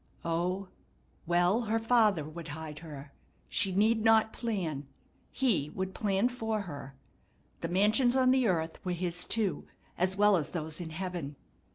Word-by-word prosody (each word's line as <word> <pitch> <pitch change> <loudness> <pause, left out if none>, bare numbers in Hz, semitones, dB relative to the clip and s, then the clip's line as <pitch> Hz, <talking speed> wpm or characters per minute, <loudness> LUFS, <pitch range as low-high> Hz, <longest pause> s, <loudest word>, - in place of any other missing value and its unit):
O, 180 +4 -1 0.6
well, 175 +6 +3
her 225 - +2
Father 225 -7 +3
would 165 +1 -8
hide 155 -1 -7
her. 145 -4 -10 0.4
She 195 - +3
need 215 +4 +2
not 220 -1 +4
plan; 170 - -3 0.4
He 220 - +1
would 190 0 -3
plan 200 +1 +1
for 225 -4 -2
her. 145 -7 -8 0.6
The - - -3
mansions 215 +7 +3
on 255 -1 +4
the 260 -2 +3
earth 165 -4 -1
were 180 - -1
His 175 0 -1
too, 215 -4 -1 0.3
as 185 +2 +1
well 205 -1 +5
as 155 0 -4
those 160 -1 -3
in 165 - -5
heaven. 165 -4 -5
185 Hz, 155 wpm, -30 LUFS, 165-220 Hz, 0.6 s, well